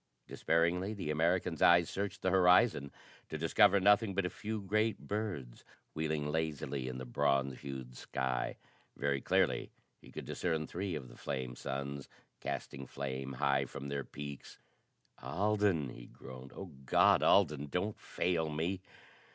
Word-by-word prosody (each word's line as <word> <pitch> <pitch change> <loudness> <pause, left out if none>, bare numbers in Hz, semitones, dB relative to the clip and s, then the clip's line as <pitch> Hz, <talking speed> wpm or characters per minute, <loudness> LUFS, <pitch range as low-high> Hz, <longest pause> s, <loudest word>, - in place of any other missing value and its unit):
Despairingly, 85 +5 +1
the 85 -7 -3
American's 85 +1 +1
eyes 85 -1 +6
searched 100 +1 -4
the 95 - +2
horizon, 90 - +5 0.4
to 80 - -3
discover 100 +5 +5
nothing 105 +1 +4
but 100 -1 +1
a 90 - -2
few 110 +1 -4
great 110 +2 +1
birds 95 - -4 0.3
wheeling 75 -1 -1
lazily 75 -4 -2
in 65 0 -4
the 65 - -6
bronze 65 +2 +1
hued 65 -3 -7
sky. 65 0 -2 0.4
Very 70 -1 0
clearly - - +2 0.3
he - - -15
could - - -7
discern 80 -3 -1
three 90 +1 -3
of 70 -4 -6
the - - -14
flame 65 -2 -4
suns, 70 +1 -5 0.3
casting 65 -1 -5
flame 65 0 -4
high 70 +1 +2
from 70 +1 -7
their 70 -1 -2
peaks. 70 0 -8 0.6
"Alden!" 100 -6 +1
he - - -10
groaned. 65 0 -11
"Oh 95 -3 -7
God, 65 - +5
Alden, 75 -7 +4
don't 90 +8 -2
fail 80 -3 -1
me!" 85 +5 -2
80 Hz, 145 wpm, -34 LUFS, 70-95 Hz, 0.6 s, eyes